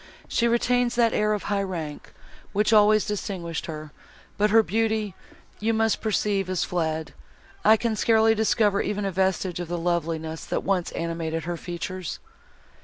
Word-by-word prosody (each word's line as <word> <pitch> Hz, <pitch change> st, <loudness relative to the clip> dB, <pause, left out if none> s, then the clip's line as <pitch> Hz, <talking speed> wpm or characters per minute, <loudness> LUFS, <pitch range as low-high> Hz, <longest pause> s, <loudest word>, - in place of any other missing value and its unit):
She 235 Hz, -, +1 dB
retains 245 Hz, +1 st, +2 dB
that 235 Hz, -1 st, +3 dB
air 210 Hz, 0 st, +2 dB
of 210 Hz, -, -3 dB
high 200 Hz, -1 st, 0 dB
rank, 165 Hz, -6 st, -5 dB, 0.4 s
which 210 Hz, +2 st, +2 dB
always 215 Hz, 0 st, +5 dB
distinguished 185 Hz, -5 st, -4 dB
her, 155 Hz, -2 st, -7 dB, 0.4 s
but 210 Hz, +1 st, +2 dB
her 225 Hz, +1 st, +6 dB
beauty, 220 Hz, -1 st, 0 dB, 0.5 s
you 225 Hz, +1 st, +1 dB
must 225 Hz, -1 st, +1 dB
perceive, 205 Hz, -3 st, 0 dB
is 185 Hz, -2 st, 0 dB
fled; 160 Hz, -3 st, -2 dB, 0.5 s
I 220 Hz, +1 st, +6 dB
can 230 Hz, 0 st, -1 dB
scarcely 225 Hz, 0 st, +4 dB
discover 215 Hz, -2 st, +2 dB
even 205 Hz, 0 st, -2 dB
a 195 Hz, -, -1 dB
vestige 190 Hz, -1 st, 0 dB
of 175 Hz, -, -4 dB
the 175 Hz, +1 st, -3 dB
loveliness, 165 Hz, -2 st, -2 dB
that -, -, -2 dB
once 185 Hz, -3 st, 0 dB
animated 165 Hz, -1 st, -3 dB
her 175 Hz, +1 st, -3 dB
features." 175 Hz, +1 st, -5 dB
195 Hz, 160 wpm, -25 LUFS, 170-220 Hz, 0.5 s, her